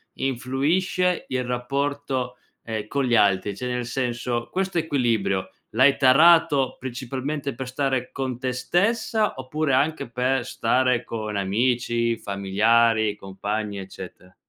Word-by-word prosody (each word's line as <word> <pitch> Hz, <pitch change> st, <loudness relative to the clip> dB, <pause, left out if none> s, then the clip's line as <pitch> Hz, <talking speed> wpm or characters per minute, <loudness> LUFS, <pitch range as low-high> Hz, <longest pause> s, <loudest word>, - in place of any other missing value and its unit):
influisce 145 Hz, +8 st, 0 dB
il 130 Hz, -1 st, -1 dB
rapporto, 130 Hz, 0 st, -2 dB, 0.3 s
ehm, 110 Hz, -2 st, -4 dB
con 140 Hz, +3 st, -1 dB
gli 120 Hz, -1 st, +2 dB
altri? 100 Hz, -2 st, +2 dB
Cioè, 125 Hz, +5 st, -5 dB
nel 125 Hz, -1 st, -2 dB
senso: 120 Hz, -1 st, -2 dB
questo 190 Hz, -1 st, -1 dB
equilibrio 115 Hz, -, 0 dB, 0.2 s
l'hai 130 Hz, +5 st, +4 dB
tarato, 145 Hz, 0 st, +5 dB
principalmente, 130 Hz, +3 st, -4 dB
per 130 Hz, -1 st, -5 dB
stare 130 Hz, -1 st, -1 dB
con 130 Hz, -3 st, -3 dB
te 130 Hz, -1 st, -1 dB
stessa? 210 Hz, -, +1 dB
Oppure 140 Hz, +3 st, -1 dB
anche 145 Hz, +1 st, +1 dB
per 125 Hz, +1 st, 0 dB
stare 125 Hz, 0 st, +1 dB
con 110 Hz, -2 st, -4 dB
amici, 115 Hz, +3 st, 0 dB
familiari, 110 Hz, +2 st, +2 dB
compagni, 100 Hz, +1 st, -4 dB
eccetera? 95 Hz, -1 st, -10 dB
125 Hz, 120 wpm, -24 LUFS, 115-140 Hz, 0.3 s, tarato